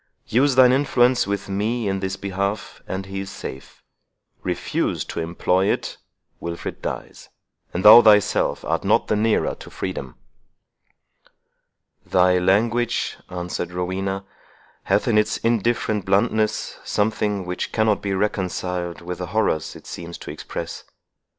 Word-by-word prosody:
Use 130 +3 +2
thine 130 -1 +7
influence 130 -3 +3
with 100 0 -2
me 105 +3 -1
in 95 -1 -1
his 95 0 -3
behalf, 100 +1 -3
and 95 +1 -4
he 95 0 -5
is 95 -1 -5
safe,—refuse 65 - -5
to - - -5
employ 90 +3 +1
it, - - -3 0.4
Wilfred 85 0 -6
dies, - - -6 0.4
and 90 - -3
thou 110 +3 +11
thyself 105 -3 +3
art - - -1
not - - +2
the - - +3
nearer 110 +1 +1
to - - -11
freedom." 70 -9 -5 1.9
"Thy 90 -1 +3
language," 110 +6 +1
answered 90 0 -4
Rowena, 95 +2 -3 0.6
"hath 100 +4 +2
in 110 -3 +4
its 105 0 0
indifferent 115 -2 0
bluntness 105 +2 +1
something 105 -2 0
which 90 0 -4
cannot 110 -2 +2
be 100 -1 -1
reconciled 90 -3 -2
with 90 +1 -6
the 90 - -4
horrors 90 -5 0
it - - -13
seems 85 0 -7
to - - -8
express. - - -6
100 Hz, 130 wpm, -22 LUFS, 90-110 Hz, 1.9 s, thou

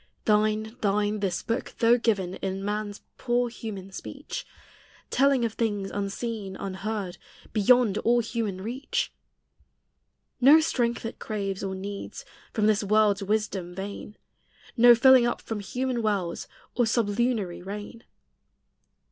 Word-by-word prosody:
Thine, 215 +1 +2
thine, 210 +1 +1
this 190 -3 -1
book, 230 +2 -3
though 235 0 +5
given 200 -6 0
In 195 0 -3
man's 210 0 -3 0.2
poor 245 -1 +1
human 205 -4 -7
speech, - - -7 0.6
Telling 270 -3 +3
of 225 - -2
things 205 -4 -1
unseen, 200 0 -4
unheard, 195 0 -4 0.3
Beyond 220 -1 +4
all 240 +2 +3
human 220 -5 -2
reach. 275 - -2 1.3
No 280 +5 +8
strength 240 -8 0
it 225 - -6
craves 200 -3 -3
or 190 -1 -3
needs 200 +1 -6 0.3
From 215 -3 0
this 215 0 +3
world's 210 0 +3
wisdom 200 -3 -2
vain; 200 +2 -7 0.6
No 240 +1 +8
filling 255 0 +6
up 240 - -1
from 220 -2 -5
human 250 +4 -2
wells, 200 -6 -1 0.3
Or 240 -2 +2
sublunary 220 -4 0
rain. 205 +5 -7
215 Hz, 125 wpm, -27 LUFS, 195-235 Hz, 1.3 s, No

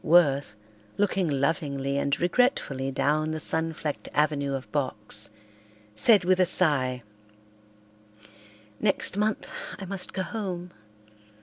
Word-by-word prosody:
Worth, 145 -9 +3 0.4
looking 195 -3 +1
lovingly 140 -1 -1
and 140 +1 0
regretfully 175 - +1
down 150 +3 +1
the 155 0 -3
sun 160 +1 -1
flecked 155 -2 -5
avenue 145 -2 +1
of 135 - -7
box, 105 -7 0 0.6
said 190 - +5
with 185 0 +3
a 185 - +5
sigh, 130 -9 +2 1.8
"Next 195 -2 +1
month 210 +1 -1 0.3
I 195 - -7
must 190 0 -3
go 190 - -2
home. 180 -2 -5
155 Hz, 115 wpm, -27 LUFS, 140-185 Hz, 1.8 s, said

